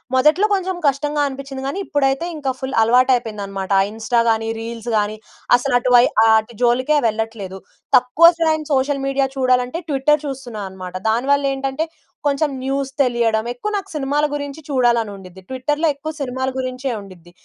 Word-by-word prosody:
మొదట్లో 305 +9 +4
కొంచెం 375 -1 -2
కష్టంగా 295 +2 0
అనిపించింది. 270 0 -7
కానీ, 280 +8 -3
ఇప్పుడైతే 275 +2 0
ఇంకా 275 -3 -1
ఫుల్ 265 0 -4
అలవాటు 250 +3 +4
అయిపోయింది 220 -4 -4
అన్నమాట. 195 0 -5 0.2
ఇన్‌స్టా 225 +2 0
గాని, 225 0 +1
రీల్స్ 230 0 -6
గాని, 210 +1 -1 0.4
అసలు 245 +1 -1
అటు 250 - -1
వై 240 - +8 0.2
ఆ - - +5
అటు 220 +2 -9
జోలికే 255 +5 +3
వెళ్ళట్లేదు. 215 -3 -4 0.4
తక్కువ 250 +7 +5 0.2
టైమ్ 315 -1 +1
సోషల్ 275 +1 +1
మీడియా 275 0 +1
చూడాలంటే 255 +3 +1
ట్విట్టర్ 295 +1 +2
చూస్తున్నా 255 -6 -6
అన్నమాట. 185 -1 -9
దానివల్ల 275 +5 +2
ఏంటంటే 270 +3 -2 0.4
కొంచెం 290 +1 +1
న్యూస్ 270 0 -2
తెలియడం 235 -4 +1
ఎక్కువ 420 +13 -4
నాకు 390 0 -6
సినిమాల 290 +1 0
గురించి 285 +1 -5
చూడాలని 240 -5 +2
ఉండిద్ధి 190 -1 -13
ట్విట్టర్‌లో 295 +5 0
ఎక్కువ 310 +3 -6
సినిమాల 260 0 -2
గురించేది 255 -1 -3
ఉండిద్ధి. 180 -3 -14
260 Hz, 160 wpm, -20 LUFS, 230-280 Hz, 0.4 s, వై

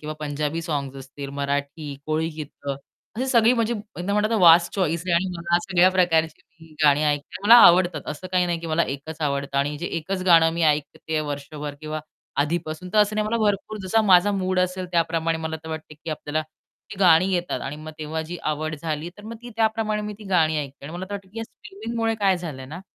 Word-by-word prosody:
किंवा 155 0 -5
पंजाबी 150 +2 -2
सॉन्ग्स 140 -5 -3
असतील, 135 +1 -8
मराठी, 140 +1 -3
कोळी 160 +1 0
गीतं 145 -2 -6 0.4
अशी 255 - -1
सगळी 235 -2 +5
म्हणजे 235 -1 0 0.2
एकदा 190 +3 -2
म्हणतात 210 +2 +1
ना, 225 - +2
वास्ट 170 -3 +6
चॉइस 170 -4 0
आहे 175 - 0
आणि 175 +3 +2
मी 170 - -7
या 175 - +6
सगळ्या 185 -1 +4
प्रकारची 165 -2 -1
गाणी 145 0 +5
ऐकते, 145 0 -1
मला 230 - +10
आवडतात. 175 -4 +4
असं 150 +4 -6
काही 180 -1 +3
नाही, 170 -1 -1
की 165 - -6
मला 160 +1 +2
एकच 150 +3 -5
आवडतं 140 -1 -1
आणि 145 +2 0
जे 175 - -4
एकच 185 +4 -4
गाणं 165 -2 +6
मी 170 0 -2
ऐकतेय 155 +1 0
वर्षभर 145 0 -5
किंवा 155 0 -4 0.4
आधीपासून. 160 +3 -2
तर 215 - +3
असं 210 0 +3
नाही 215 - +1
मला 225 +2 0
भरपूर 205 +1 -1
जसा 190 +4 +2
माझा 195 0 +5
मूड 185 -1 -1
असेल 185 0 -1
त्याप्रमाणे 165 -1 +1
मला 160 0 -3
तर 160 - -9
वाटते, 160 -1 -7
की 160 +2 -8
आपल्याला 155 0 -2 0.5
ती 195 - -9
गाणी 180 0 +5
येतात. 175 -7 -1
आणि 140 +4 -5
मग 155 +1 -9
तेव्हा 155 +1 -3
जी 165 +3 -6 0.2
आवड 155 +1 -3
झाली 155 +1 -4
तर 205 - -13
मग 230 +2 -7
ती 240 - -9
त्याप्रमाणे 220 -1 0
मी 210 0 -4
ती 215 - -12
गाणी 160 -2 +3
ऐकते. 140 -1 -7
आणि 150 - -7
मला 180 - -4
तर - - -3
वाटतं, 195 -1 -8
की 220 +4 -9
या 225 - -3
स्ट्रीमिंगमुळे 225 +2 -4
काय 195 -2 +3
झालंय 140 -7 -7
ना, 160 +6 -8
165 Hz, 215 wpm, -24 LUFS, 150-190 Hz, 0.5 s, मला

